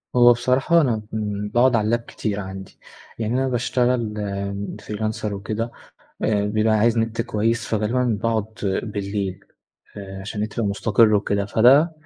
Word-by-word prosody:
هو 120 Hz, 0 st, +7 dB
بصراحة 130 Hz, +8 st, +2 dB
أنا 120 Hz, -7 st, 0 dB
كن 105 Hz, -1 st, -3 dB
باقعد 125 Hz, +1 st, +4 dB
على 110 Hz, -2 st, +1 dB
اللاب 115 Hz, +2 st, +2 dB
كتير 105 Hz, -3 st, -4 dB
عندي، 95 Hz, -1 st, -8 dB, 0.4 s
يعني 110 Hz, 0 st, -1 dB
أنا 130 Hz, +1 st, +1 dB
باشتغل 125 Hz, -2 st, 0 dB, 0.7 s
freelancer 110 Hz, +1 st, -4 dB
وكده، 110 Hz, +3 st, -3 dB, 0.5 s
آآ 105 Hz, -2 st, +1 dB
بيبقى 110 Hz, +1 st, +1 dB
عايز 115 Hz, +2 st, +3 dB
نت 115 Hz, 0 st, 0 dB
كويس، 115 Hz, 0 st, -1 dB
فغالبًا 110 Hz, +4 st, 0 dB, 0.2 s
باقعد 115 Hz, -2 st, +1 dB, 0.4 s
بالليل 100 Hz, -3 st, -3 dB, 0.6 s
آآ، 95 Hz, -1 st, -8 dB
عشان 105 Hz, +2 st, -5 dB
النت 105 Hz, 0 st, -2 dB
يبقى 115 Hz, -, +1 dB
مستقر 110 Hz, +2 st, +3 dB
وكده، 100 Hz, 0 st, +1 dB
فده 135 Hz, +10 st, +5 dB
110 Hz, 145 wpm, -22 LUFS, 105-120 Hz, 0.7 s, هو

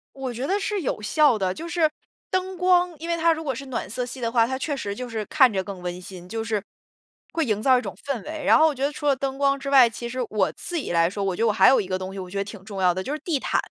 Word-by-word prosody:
我 260 Hz, -2 st, -4 dB
觉 250 Hz, +4 st, -3 dB
得 400 Hz, +3 st, +1 dB
是 405 Hz, -1 st, -2 dB
有 245 Hz, -, -2 dB
效 285 Hz, +1 st, +3 dB
的， 185 Hz, -2 st, 0 dB
就 335 Hz, -, -7 dB
是 335 Hz, -2 st, +2 dB, 0.4 s
灯 370 Hz, 0 st, -2 dB
光 360 Hz, -1 st, +3 dB
因 335 Hz, -, -6 dB
为 335 Hz, -, +2 dB
它 335 Hz, 0 st, +4 dB
如 320 Hz, 0 st, -5 dB
果 270 Hz, -3 st, -1 dB
是 270 Hz, +3 st, -8 dB
暖 250 Hz, -, -4 dB
色 245 Hz, +3 st, -3 dB
系 255 Hz, +1 st, -8 dB
的 230 Hz, 0 st, -1 dB
话， 230 Hz, -2 st, +4 dB
它 260 Hz, 0 st, -2 dB
确 285 Hz, +2 st, -2 dB
实 200 Hz, -6 st, -4 dB
就 250 Hz, +1 st, -5 dB
是 220 Hz, -2 st, -3 dB
看 260 Hz, -6 st, +5 dB
着 190 Hz, -2 st, -1 dB
更 190 Hz, -1 st, -8 dB
温 180 Hz, 0 st, -5 dB
馨， 180 Hz, -1 st, -10 dB
就 225 Hz, +2 st, -3 dB
是 215 Hz, -3 st, -1 dB, 0.7 s
会 325 Hz, -3 st, +1 dB
营 215 Hz, -2 st, 0 dB
造 260 Hz, 0 st, +5 dB
一 -, -, 0 dB
种 -, -, -6 dB
氛 270 Hz, -6 st, -3 dB
围。 310 Hz, 0 st, -6 dB
然 -, -, +6 dB
后 320 Hz, -, +6 dB
我 305 Hz, -, 0 dB
觉 265 Hz, -, -4 dB
得 285 Hz, -, +1 dB
除 295 Hz, 0 st, -7 dB
了 280 Hz, -2 st, +4 dB
灯 270 Hz, 0 st, -3 dB
光 275 Hz, 0 st, +2 dB
之 275 Hz, -, -4 dB
外， 260 Hz, -4 st, +7 dB
其 235 Hz, +1 st, -6 dB
实 255 Hz, +1 st, -5 dB
我 215 Hz, -, +1 dB
自 350 Hz, -, -6 dB
己 285 Hz, -, -3 dB
来 170 Hz, 0 st, +3 dB
说， 200 Hz, +1 st, -4 dB
我 190 Hz, -2 st, 0 dB
觉 -, -, -4 dB
得 -, -, +4 dB
我 -, -, +4 dB
还 -, -, +6 dB
有 265 Hz, -, +5 dB
一 190 Hz, -, -3 dB
个 185 Hz, -1 st, -1 dB
东 185 Hz, 0 st, -6 dB
西 195 Hz, -, -6 dB
我 185 Hz, -1 st, -7 dB
觉 200 Hz, -, -6 dB
得 200 Hz, -, +1 dB
挺 205 Hz, -1 st, -10 dB
重 200 Hz, -3 st, -5 dB
要 180 Hz, -1 st, +4 dB
的， 185 Hz, +1 st, -3 dB
就 285 Hz, -, -3 dB
是 305 Hz, -, -4 dB
地 310 Hz, -6 st, -1 dB
毯。 -, -, 0 dB
255 Hz, 350 characters per minute, -24 LUFS, 200-300 Hz, 0.7 s, 外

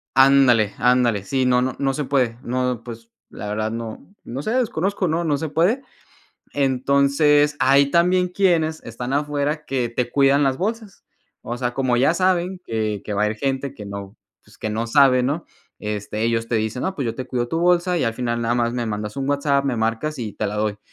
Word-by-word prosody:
Ándale, 130 Hz, -6 st, +5 dB
ándale. 125 Hz, -4 st, +2 dB
Sí, 130 Hz, +4 st, 0 dB
no 125 Hz, 0 st, +3 dB
no, 130 Hz, 0 st, -1 dB
no 135 Hz, -1 st, +1 dB
se 150 Hz, -, -2 dB
puede. 125 Hz, -4 st, 0 dB
No, 125 Hz, -1 st, -1 dB
pues 115 Hz, -1 st, -10 dB, 0.2 s
la 105 Hz, -, -8 dB
verdad 110 Hz, +1 st, -2 dB
no 115 Hz, -, -7 dB
no 130 Hz, +4 st, -5 dB
sé, 215 Hz, -, -3 dB
desconozco. 200 Hz, -6 st, 0 dB
No, 165 Hz, +1 st, 0 dB
no 150 Hz, -4 st, +1 dB
se 160 Hz, -, -3 dB
puede. 190 Hz, -, +1 dB, 0.7 s
Entonces, 140 Hz, +2 st, +2 dB
ahí 140 Hz, +1 st, +4 dB
también, 180 Hz, +2 st, +3 dB
quienes 170 Hz, -4 st, +1 dB
están 120 Hz, +3 st, -6 dB
afuera, 145 Hz, +1 st, -1 dB
que 125 Hz, -3 st, -1 dB
te 120 Hz, +1 st, -2 dB
cuidan 140 Hz, +1 st, +3 dB
las 135 Hz, -1 st, +1 dB
bolsas. 215 Hz, +1 st, -4 dB, 0.4 s
O 120 Hz, +1 st, -4 dB
sea, 125 Hz, -1 st, -2 dB
como 130 Hz, -2 st, +1 dB
ya 140 Hz, +6 st, +3 dB
saben, 185 Hz, 0 st, +1 dB
que 110 Hz, -3 st, -2 dB
que 105 Hz, -, -4 dB
va 105 Hz, +1 st, +1 dB
a -, -, +2 dB
ir 110 Hz, -, -4 dB
gente 135 Hz, +2 st, -2 dB
que 105 Hz, -, -9 dB
no 100 Hz, 0 st, -8 dB, 0.3 s
pues -, -, -21 dB
que 110 Hz, -, -4 dB
no 115 Hz, +2 st, -2 dB
sabe, 130 Hz, 0 st, +4 dB
¿no? 145 Hz, +6 st, -1 dB, 0.3 s
Este, 105 Hz, 0 st, -4 dB
ellos 115 Hz, 0 st, 0 dB
te -, -, -1 dB
dicen: 110 Hz, +2 st, -1 dB
"No, 190 Hz, -, -2 dB
pues 140 Hz, -, -3 dB
yo 115 Hz, -1 st, -2 dB
te 130 Hz, +1 st, -6 dB
cuido 120 Hz, -1 st, -2 dB
tu 165 Hz, -, -2 dB
bolsa. 175 Hz, +1 st, +2 dB
Y -, -, 0 dB
al 115 Hz, -1 st, -1 dB
final, 120 Hz, -1 st, -2 dB
nada 120 Hz, 0 st, 0 dB
más 120 Hz, -1 st, 0 dB
me 120 Hz, -1 st, -2 dB
mandas 105 Hz, -1 st, -4 dB
un 135 Hz, -, -2 dB
WhatsApp. 140 Hz, -1 st, +1 dB
Me 130 Hz, -3 st, 0 dB
marcas, 115 Hz, +7 st, -1 dB
y 110 Hz, -3 st, -4 dB
te -, -, -3 dB
la 105 Hz, +1 st, -4 dB
doy". 105 Hz, -1 st, -1 dB
130 Hz, 215 wpm, -22 LUFS, 115-150 Hz, 0.7 s, Ándale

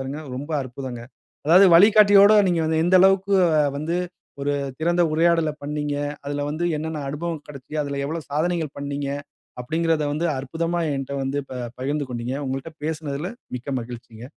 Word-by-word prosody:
பாருங்க, 135 Hz, +3 st, -5 dB, 0.2 s
ரொம்ப 145 Hz, +4 st, -6 dB
அற்புதங்க. 125 Hz, -1 st, -7 dB, 0.4 s
அதாவது, 180 Hz, +5 st, +7 dB
"வழிகாட்டியோட 205 Hz, +1 st, +7 dB, 0.2 s
நீங்க 170 Hz, -2 st, +1 dB
வந்து, 160 Hz, 0 st, +1 dB
எந்த 185 Hz, +1 st, +5 dB
அளவுக்கு 195 Hz, +1 st, +4 dB, 0.4 s
வந்து 165 Hz, +4 st, -2 dB, 0.5 s
ஒரு 145 Hz, +1 st, 0 dB, 0.3 s
திறந்த 175 Hz, +2 st, +2 dB
உரையாடல 165 Hz, -1 st, +2 dB
பண்ணீங்க, 150 Hz, 0 st, -2 dB, 0.3 s
அதில 145 Hz, 0 st, -2 dB
வந்து 160 Hz, +3 st, -1 dB
என்னென்ன 155 Hz, -1 st, -4 dB
அனுபவம் 160 Hz, +1 st, -4 dB
கெடைச்சுது, 150 Hz, +2 st, -6 dB
அதில 140 Hz, -1 st, -3 dB
எவ்வளவு 160 Hz, +1 st, -5 dB
சாதனைகள் 160 Hz, 0 st, -1 dB
பண்ணினீங்க." 140 Hz, 0 st, -3 dB, 0.5 s
அப்படீங்கிறதை 160 Hz, +3 st, 0 dB
வந்து 160 Hz, +3 st, -1 dB
அற்புதமா 165 Hz, +6 st, -2 dB, 0.2 s
என்ட்ட 135 Hz, 0 st, -4 dB
வந்து 135 Hz, +2 st, -2 dB
ப -, -, -7 dB, 0.3 s
பகிர்ந்து 145 Hz, +3 st, -1 dB
கொண்டீங்க. 120 Hz, +2 st, -3 dB
உங்கள்ட்ட 135 Hz, +4 st, -4 dB
பேசினதுல 155 Hz, +1 st, -3 dB, 0.3 s
மிக்க 125 Hz, +3 st, -7 dB
மகிழ்ச்சிங்க. 115 Hz, -1 st, -10 dB
150 Hz, 145 wpm, -23 LUFS, 140-170 Hz, 0.5 s, அதாவது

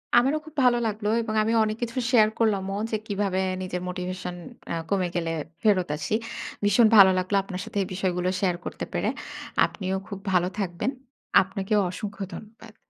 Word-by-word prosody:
আমারও 265 Hz, +5 st, +4 dB
খুব 315 Hz, -1 st, -13 dB
ভালো 245 Hz, -1 st, +5 dB
লাগলো, 210 Hz, 0 st, -3 dB
এবং 220 Hz, -1 st, -3 dB
আমি 220 Hz, -, 0 dB
অনেক 215 Hz, 0 st, -1 dB
কিছু 235 Hz, +2 st, -4 dB
শেয়ার 220 Hz, -4 st, +6 dB
করলামও 200 Hz, -3 st, +1 dB
যে -, -, +1 dB
কিভাবে 200 Hz, -2 st, 0 dB, 0.2 s
নিজের 180 Hz, -1 st, -3 dB
মোটিভেশন 180 Hz, 0 st, -4 dB, 0.4 s
আ -, -, 0 dB, 0.2 s
কমে 190 Hz, -2 st, +1 dB
গেলে 165 Hz, -2 st, 0 dB, 0.3 s
ফেরত 195 Hz, -5 st, +3 dB
আসি। 160 Hz, -, -3 dB, 0.5 s
ভীষণ 210 Hz, +3 st, +6 dB
ভালো 195 Hz, -2 st, +10 dB
লাগলো 185 Hz, +2 st, 0 dB
আপনার 190 Hz, -1 st, -6 dB
সাথে -, -, -6 dB
এই -, -, -6 dB
বিষয়গুলো 180 Hz, -1 st, 0 dB
শেয়ার 180 Hz, -3 st, +2 dB
করতে -, -, -4 dB
পেরে। -, -, 0 dB, 0.6 s
আপনিও 190 Hz, -1 st, -3 dB
খুব 200 Hz, -2 st, -6 dB
ভালো 180 Hz, -1 st, +3 dB
থাকবেন। 185 Hz, +5 st, -1 dB, 0.5 s
আপনাকেও 195 Hz, +2 st, 0 dB
অসংখ্য 200 Hz, +2 st, -5 dB
ধন্যবাদ। 215 Hz, +3 st, -11 dB
195 Hz, 165 wpm, -26 LUFS, 185-215 Hz, 0.6 s, ভালো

